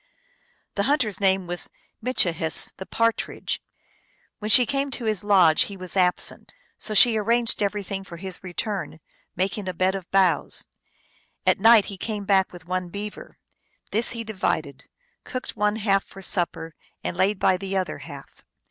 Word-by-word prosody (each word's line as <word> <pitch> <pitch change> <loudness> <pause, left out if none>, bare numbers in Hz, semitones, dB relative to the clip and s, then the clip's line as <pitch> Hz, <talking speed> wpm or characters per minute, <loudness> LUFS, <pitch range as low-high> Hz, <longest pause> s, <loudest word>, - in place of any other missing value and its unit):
The 200 - -1
hunter 285 -6 +2
s 190 - -7
name 190 -1 +2
was 175 0 -2 0.3
Mitchihess, 170 -10 +1
the 190 - -8
Partridge. 230 0 -1 0.8
"When 215 - -4
she 245 +3 +7
came 275 +3 -1
to 250 -3 -5
his 215 -4 -1
lodge 185 -6 +5
he 200 - -8
was 185 0 -4
absent. 180 - 0 0.2
So 215 - -2
she 230 0 +7
arranged 230 +2 +3
everything 200 -1 -2
for 175 -3 -10
his 190 +1 -6
return, 185 -3 -4 0.4
making 190 +2 -1
a 180 - -5
bed 185 +2 +2
of 190 -3 -6
boughs. 190 -3 +2 0.8
At - - +3
night 225 -1 +7
he 200 - -6
came 210 0 -4
back 195 -1 +3
with 175 -2 -12
one 180 0 -3
beaver. 205 +3 -8 0.5
This 225 +3 +2
he 230 -1 -4
divided; 160 -10 -3 0.4
cooked 255 -1 -5
one 210 0 +1
half 200 -3 +1
for 195 - -12
supper 170 -3 -1 0.3
and - - -3
laid 190 +2 +1
bv 185 -1 +3
the 195 0 -2
other 185 - -2
half. - - -12
195 Hz, 165 wpm, -24 LUFS, 185-215 Hz, 0.8 s, she